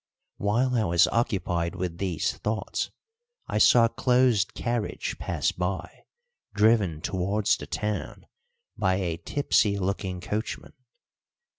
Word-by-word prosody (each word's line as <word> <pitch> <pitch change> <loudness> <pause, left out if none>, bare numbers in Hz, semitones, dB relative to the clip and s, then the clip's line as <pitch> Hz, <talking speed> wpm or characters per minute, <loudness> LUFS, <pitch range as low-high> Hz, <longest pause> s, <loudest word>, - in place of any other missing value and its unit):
While 120 +6 +1
I 115 -3 +2
was 85 -1 +4
occupied 90 -7 -1
with 90 -2 -4
these 90 -6 -1
thoughts 110 +1 -2 0.6
I - - -1
saw 120 -1 +7
a - - +1
closed 125 -4 +2
carriage 120 -3 -3
pass - - -1
by, 90 +1 -4 0.5
driven 105 -7 +3
towards 100 +4 +1
the - - -9
town 105 0 -4 0.5
by 95 -2 +1
a 90 -4 -2
tipsy 100 - +1
looking 95 -1 -2
coachman. 105 +5 -4
100 Hz, 120 wpm, -26 LUFS, 90-115 Hz, 0.6 s, saw